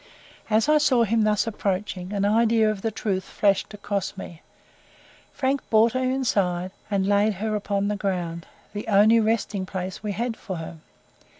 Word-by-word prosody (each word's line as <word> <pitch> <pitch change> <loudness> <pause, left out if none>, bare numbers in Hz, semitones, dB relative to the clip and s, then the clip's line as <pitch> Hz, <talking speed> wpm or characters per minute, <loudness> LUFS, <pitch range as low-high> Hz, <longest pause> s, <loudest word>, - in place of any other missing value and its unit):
As 220 +4 +3
I 305 0 +5
saw 260 -5 +3
him 225 +1 +1
thus 210 -1 +2
approaching, 195 -3 -3
an 200 -1 0
idea 220 +1 +3
of 205 -2 -6
the 225 - 0
truth 200 -3 -2
flashed 200 -2 +1
across 200 -1 -3
me. 170 -3 -9 0.9
Frank 270 0 -1
brought 225 +1 +4
her 255 - -1
inside, 200 -9 0 0.2
and 195 -2 0
laid 205 +1 +2
her 215 +3 -2
upon 200 -1 -1
the 210 - -1
ground 175 -4 -3 0.3
the 210 +2 -5
only 215 +2 +5
resting 220 -3 0
place 185 0 -5
we 210 -2 -3
had 235 +3 -2
for 190 -4 -6
her. 165 0 -7
205 Hz, 170 wpm, -24 LUFS, 190-225 Hz, 0.9 s, I